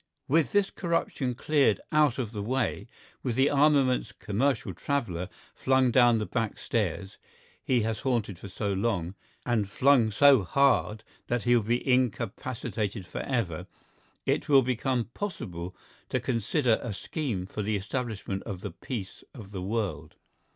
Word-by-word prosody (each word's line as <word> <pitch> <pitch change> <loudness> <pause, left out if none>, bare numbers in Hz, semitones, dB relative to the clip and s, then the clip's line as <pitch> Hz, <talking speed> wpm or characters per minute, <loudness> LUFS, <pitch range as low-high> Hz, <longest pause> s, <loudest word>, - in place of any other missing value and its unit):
With 155 +2 +2
this 205 -1 +2
corruption 165 -7 -1
cleared 140 -4 +2
out 150 -5 +3
of 120 -5 -3
the 105 -3 -4
way, 120 +3 -1 0.3
with 120 -3 -2
the 135 +3 +3
armaments 140 -6 +3
commercial 115 +7 -1
traveller 100 - -2 0.2
flung 130 -1 +2
down 120 -1 +5
the 105 - -1
back 115 -2 -2
stairs 100 -2 -2 0.4
he 125 -2 +2
has 110 0 -1
haunted 115 -8 -1
for 100 - -8
so 100 +1 -2
long—and 100 +2 -2
flung 130 0 +4
so 135 +3 +6
hard 110 0 +2 0.2
that 120 -3 -1
he 120 0 +4
will 120 - +4
be 120 +5 -1
incapacitated 115 -4 -1
for - - -5
ever—it 115 - -4
will 135 -2 +7
become 125 0 0
possible 90 - -5 0.3
to - - 0
consider 120 +1 +1
a 115 - -4
scheme 110 - -3
for 105 +2 -5
the 105 +1 0
establishment 105 -2 -3
of 95 -5 -6
the 100 - -5
peace 100 +1 -7
of 105 -6 -10
the 95 -3 -5
world. 95 -7 -3
115 Hz, 145 wpm, -28 LUFS, 100-130 Hz, 0.4 s, will